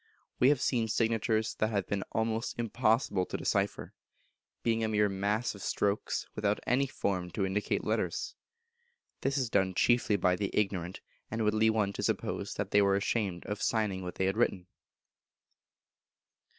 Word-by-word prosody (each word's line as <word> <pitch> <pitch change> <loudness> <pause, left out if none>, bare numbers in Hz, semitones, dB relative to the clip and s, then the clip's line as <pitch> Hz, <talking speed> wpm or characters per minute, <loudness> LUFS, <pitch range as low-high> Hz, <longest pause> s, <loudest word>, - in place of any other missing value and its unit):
We 125 - +6
have 145 -3 +3
seen 120 -4 +1
signatures 110 0 +1
that 110 - +2
have 100 -3 -1
been 100 -1 -2
almost 110 0 -1
impossible 115 -3 +1
to - - -3
decipher, - - -1 0.7
being 115 -1 +1
a - - +1
mere 105 -1 +2
mass 100 +4 -1
of 100 - -11
strokes, 100 +2 -1
without 105 -1 0
any 135 +3 +2
form 95 -8 -2
to 100 - 0
indicate 100 +2 -1
letters. - - -1 0.9
This 135 +1 0
is 125 -4 -1
done 95 -2 +2
chiefly 120 -1 +3
by 90 -1 +2
the 100 0 -1
ignorant, 95 -4 -1 0.3
and 115 0 -2
would 105 0 +2
lead 110 +1 +4
one 105 -3 +1
to - - -4
suppose - - -2
that - - -3
they 105 - +5
were 100 -1 +3
ashamed 100 -3 -1
of 105 +1 -4
signing 105 -4 0
what 90 -1 -6
they 95 - 0
had 95 +3 0
written. 100 -6 +1
105 Hz, 165 wpm, -31 LUFS, 100-115 Hz, 0.9 s, We